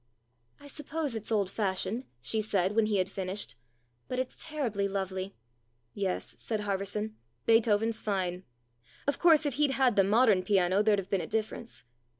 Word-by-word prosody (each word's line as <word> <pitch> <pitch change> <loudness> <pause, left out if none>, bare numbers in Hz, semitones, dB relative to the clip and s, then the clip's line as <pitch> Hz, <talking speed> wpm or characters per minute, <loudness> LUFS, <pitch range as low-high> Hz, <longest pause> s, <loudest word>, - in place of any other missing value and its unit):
" 120 -1 -44
I - - -15
suppose 295 0 -4
it's 220 0 -4
old 205 -3 +2
fashioned," 200 +4 -1 0.2
she 220 - +1
said, 200 -2 +1
when 225 -1 +3
he 210 -2 +1
had 185 -1 +1
finished, 190 -6 -2 0.3
" 120 0 -43
but 255 - -3
it's 255 0 -2
terribly 245 -11 -1
lovely." 190 0 -3 0.6
"Yes," 195 -2 -2
said 215 -2 -2
Harverson, 205 +2 -2 0.3
"Beethoven's 225 0 +3
fine. 185 -3 -1 0.6
Of 285 - 0
course, 320 -3 +5
if 290 - 0
he'd 285 -2 +4
had 255 -4 +3
the 195 - +5
modern 210 -1 +4
piano 190 0 +3
there'd 210 -1 +3
have 195 -1 -5
been 195 -3 +2
a - - -5
difference. 220 - -4
210 Hz, 170 wpm, -30 LUFS, 190-230 Hz, 0.6 s, course